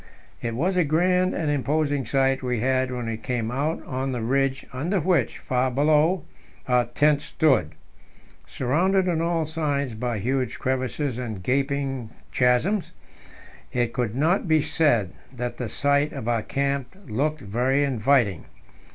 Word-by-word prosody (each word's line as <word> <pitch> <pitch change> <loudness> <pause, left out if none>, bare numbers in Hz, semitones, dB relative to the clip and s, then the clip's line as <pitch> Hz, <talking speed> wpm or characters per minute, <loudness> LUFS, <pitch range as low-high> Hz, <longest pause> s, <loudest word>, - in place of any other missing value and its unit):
It 115 -1 -3
was 180 +8 0
a 180 - +4
grand 180 +4 +2
and 155 -3 0
imposing 145 -2 0
sight 135 0 +2
we 125 -3 -1
had 130 +2 +1
when 125 -2 -4
we 115 -1 -3
came 115 0 -3
out 145 +6 -2
on 130 +1 -3
the 120 - -3
ridge 135 +2 0
under 170 +10 0
which 175 +2 +1
far 130 0 0
below 150 +6 +3 0.4
our 125 -1 +3
tent 145 +5 +2
stood. 130 - +1 0.7
Surrounded 185 +9 +1
on 165 -2 +1
all 165 -1 0
sides 145 -5 -1
by 120 +1 -2
huge 130 +3 -1
crevasses 130 0 -2
and 110 -7 -5
gaping 135 -1 -1 0.2
chasms, 130 - +1 0.8
it 120 -2 0
could 120 -4 -2
not 165 +8 +2
be 160 -1 +4
said 120 - +2 0.2
that 125 -2 -5
the 120 -3 -4
site 145 +3 +1
of 110 - -6
our 115 -2 +1
camp 140 - -2
looked 145 +6 -1
very 125 +7 +1
inviting. 120 - +2
135 Hz, 150 wpm, -24 LUFS, 125-155 Hz, 0.8 s, a